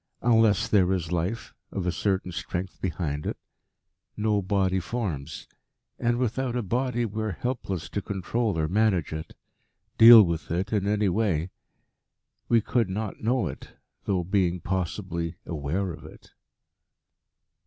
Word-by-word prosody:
Unless 110 -3 +4
there 95 -3 +3
is 85 -3 -2
life 90 +6 -2 0.2
of 95 -3 -3
a 90 - +1
certain 95 0 -1
strength 90 +3 -5
behind 75 -5 -2
it, - - -3 0.8
no 105 -1 +1
body 95 -1 +1
forms. 85 - -4 0.5
And, 120 0 +1
without 125 +1 -1
a 120 - -1
body, 120 +3 0
we 110 0 -4
are 110 -3 -2
helpless 100 -6 -3
to 100 - -3
control 100 +2 -2
or 80 -1 +1
manage 95 -4 +1
it 80 +1 -7 0.6
deal 115 -1 +11
with 85 -3 -3
it 95 +6 -2
in 100 -2 +1
any 105 0 +2
way. 95 -4 0 1.0
We 115 -1 +5
could 115 -1 0
not 105 +2 -4
know 120 +3 +1
it, - - -8 0.3
though 95 -3 0
being 90 -1 +1
possibly 85 -2 -3
aware 85 +4 -2
of - - -11
it." - - -14
95 Hz, 145 wpm, -26 LUFS, 85-110 Hz, 1.0 s, deal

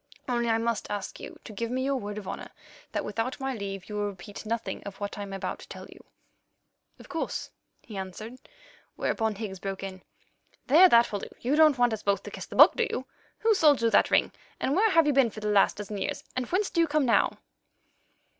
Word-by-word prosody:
Only 240 -2 0
I 225 - +3
must 230 -1 -2
ask 205 -2 -5
you - - -9
to 215 - -10
give 230 +3 -3
me 260 +2 -1
your 275 0 +1
word 205 -4 -4
of 205 -3 -7
honour - - -6 0.4
that - - -2
without 230 +7 -3
my 270 0 -2
leave 195 -4 -6
you 210 - -8
will 205 0 -1
repeat 200 +3 -10
nothing 230 +1 -3
of 200 -1 -9
what 205 0 -4
I 205 - -6
am 200 -1 -6
about 195 - -4
to - - -12
tell - - -9
you." - - -15 0.9
"Of - - -14
course," 330 - -4 0.3
he 215 -4 -9
answered, 215 +6 -7 0.6
whereon 220 -2 0
Higgs 195 -3 -6
broke 195 0 -5
in: 190 -1 -7 0.6
"There, 340 +7 +7
that 235 -3 +5
will 205 - -2
do; - - -8
you 260 +5 +1
don't 305 -3 +6
want 245 -2 +3
us 215 - -4
both 200 -1 0
to - - -8
kiss - - -7
the - - -9
Book, - - +8
do 470 - +1
you? 260 - -3 0.4
Who 445 0 +4
sold 305 -8 +5
you 230 - +3
that - - +4
ring, - - +3 0.3
and 275 - 0
where 435 +4 +4
have 330 -5 +5
you 295 - +2
been 265 -3 +4
for 215 - -9
the 210 0 -2
last 205 -1 +4
dozen 205 0 -5
years, - - -3
and 255 -1 -2
whence 385 +6 0
do 335 - +2
you 330 - +3
come 300 -1 +1
now?" 235 - +2
230 Hz, 235 wpm, -28 LUFS, 205-270 Hz, 0.9 s, Book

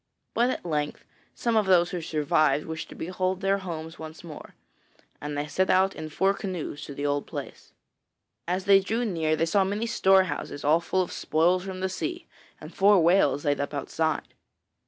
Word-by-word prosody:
But 240 +2 +2
at 255 - -4
length 150 -3 -2 0.3
some 235 -1 0
of 215 -3 +3
those 175 -2 +4
who 180 -2 -3
survived, 150 -2 +1
wished 160 0 -6
to - - -11
behold 185 +2 -2
their 195 0 +1
homes 165 -3 -7
once 160 +1 -9
more, 160 -3 -10 0.7
and 145 0 -4
they 145 - -1
set 185 +5 0
out 190 +1 +3
in 155 - -6
four 190 +5 +2
canoes 185 -7 -5
to 140 - -9
the 145 - -3
old 145 0 -1
place. - - -8 0.8
As 185 +2 -1
they 195 -1 +7
drew 225 +5 -1
near, 160 -6 0
they 165 - +1
saw 195 +4 +2
many 205 +4 -2
storehouses 190 -10 +1
all 155 +3 +4
full 185 +2 0
of 175 - -8
spoils 175 +4 +1
from 185 -1 -6
the 190 - +1
sea, 340 - -4 0.3
and - - -11
four 200 0 +5
whales 165 -5 +3
laid 145 -1 +1
up 145 +1 -3
outside. 160 +3 -2
175 Hz, 190 wpm, -26 LUFS, 155-195 Hz, 0.8 s, they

